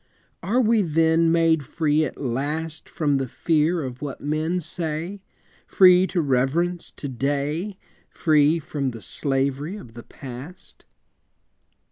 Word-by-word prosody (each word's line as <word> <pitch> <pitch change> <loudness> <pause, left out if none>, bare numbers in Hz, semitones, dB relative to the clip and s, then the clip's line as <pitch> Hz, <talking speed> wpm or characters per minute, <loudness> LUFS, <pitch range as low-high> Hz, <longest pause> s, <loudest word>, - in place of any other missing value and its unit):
Are 210 +9 +1
we 230 -2 +3
then 165 -1 +3
made 165 -2 +3
free 155 +1 +1
at 135 - -7
last 150 +5 -3
From 150 -4 0
the 135 -1 -2
fear 160 +5 +1
of 125 -2 -7
what 145 -2 -5
men 155 +4 -1
say, 170 +3 -4 0.5
Free 185 0 +6
to 180 - 0
reverence 155 +6 0
To 145 - -6
day, 145 - -2 0.3
Free 155 -1 +3
from 145 -3 -3
the 115 -3 -8
slavery 140 +4 -1
of 120 - -11
the 120 - -9
Past? 135 +10 -11
155 Hz, 130 wpm, -24 LUFS, 140-170 Hz, 0.5 s, Free